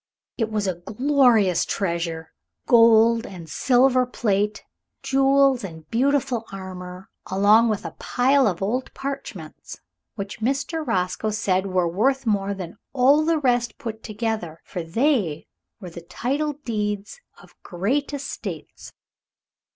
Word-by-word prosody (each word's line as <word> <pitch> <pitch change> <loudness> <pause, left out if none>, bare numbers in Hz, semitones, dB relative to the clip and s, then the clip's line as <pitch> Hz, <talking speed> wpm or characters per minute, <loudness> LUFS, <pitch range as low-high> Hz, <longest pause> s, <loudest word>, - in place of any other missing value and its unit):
It 225 -2 -1
was 215 -2 -1
a 185 - 0
glorious 225 - +3
treasure 170 -3 -3 0.3
gold 230 -1 +5
and 175 -4 -10
silver 255 - +3
plate, 210 -3 -1 0.4
jewels 270 -2 +3
and 160 -4 -9
beautiful 265 -1 +1
armor, 185 -1 -8 0.2
along 210 +4 +4
with 210 -4 -2
a 165 - -4
pile 265 +1 +2
of 185 -2 -2
old 250 +6 -2
parchments 275 0 -7 0.4
which 200 0 -6
Mr. 280 +7 -1
Roscoe 185 -2 -1
said 195 -2 0
were 185 -2 +1
worth 260 +10 +1
more 200 -2 0
than 180 -3 -8
all 275 +3 +4
the 325 +1 +2
rest 245 -5 0
put 225 -5 -6
together, 215 -7 -4
for 180 - -5
they 190 - 0 0.3
were 180 -5 -9
the 170 - -9
title 280 - -2
deeds 210 - -4 0.2
of - - -18
great 225 +12 -2
estates. 280 -1 -7
220 Hz, 130 wpm, -23 LUFS, 190-265 Hz, 0.4 s, gold